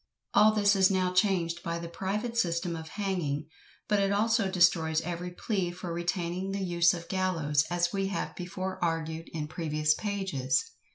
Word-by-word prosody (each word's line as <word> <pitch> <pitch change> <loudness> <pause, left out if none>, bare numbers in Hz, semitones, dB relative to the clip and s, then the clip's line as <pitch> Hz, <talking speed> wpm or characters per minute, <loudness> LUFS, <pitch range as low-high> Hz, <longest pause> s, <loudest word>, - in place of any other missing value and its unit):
All 210 +1 +6
this 205 -1 +3
is 190 -1 +5
now 185 -1 +1
changed 180 -3 +1
by 170 0 -3
the 170 0 -6
private 205 +7 -3
system 170 -5 0
of 160 -1 -7
hanging, 170 -7 -2 0.4
but 210 -1 +2
it 195 0 +2
also 215 0 +2
destroys 170 -4 +3
every 175 +1 -4
plea 185 0 -2
for 175 -1 -6
retaining 175 +2 -2
the 195 0 -2
use 170 -1 +3
of 170 - -6
the - - -18
gallows, 165 -6 +1
as 175 0 0
we 195 -1 0
have 200 - -3
before 185 +1 -4
argued 165 -1 -2
in 155 -2 -4
previous 155 -1 0
pages. 190 -11 -1
175 Hz, 175 wpm, -29 LUFS, 165-195 Hz, 0.4 s, All